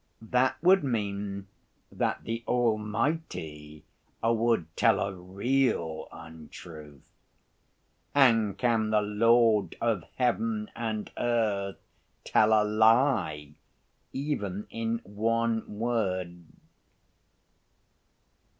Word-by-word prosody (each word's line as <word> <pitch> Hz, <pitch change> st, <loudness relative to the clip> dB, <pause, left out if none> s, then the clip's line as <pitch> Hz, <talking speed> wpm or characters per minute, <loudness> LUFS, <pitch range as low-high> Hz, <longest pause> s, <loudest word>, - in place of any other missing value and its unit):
That 125 Hz, +3 st, +1 dB
would 185 Hz, 0 st, +5 dB
mean 100 Hz, -5 st, -3 dB, 0.5 s
that -, -, -2 dB
the 115 Hz, +1 st, -4 dB
Almighty 105 Hz, -, -2 dB, 0.4 s
would 115 Hz, -5 st, +2 dB
tell -, -, +3 dB
a 100 Hz, 0 st, -2 dB
real 95 Hz, -2 st, -1 dB
untruth. 75 Hz, -2 st, -12 dB, 1.1 s
And 115 Hz, -7 st, +4 dB
can 115 Hz, -3 st, +1 dB
the 105 Hz, -1 st, +2 dB
Lord 110 Hz, +1 st, +3 dB
of 110 Hz, -7 st, 0 dB
Heaven 215 Hz, -, -1 dB
and 110 Hz, -2 st, -4 dB
earth 105 Hz, -5 st, 0 dB, 0.5 s
tell 110 Hz, 0 st, +3 dB
a 110 Hz, -1 st, +5 dB
lie, 110 Hz, -, +2 dB, 0.6 s
even 105 Hz, -9 st, -3 dB
in 115 Hz, 0 st, -2 dB
one 110 Hz, +1 st, -1 dB
word?" 95 Hz, -7 st, -2 dB
110 Hz, 85 wpm, -28 LUFS, 100-120 Hz, 1.1 s, would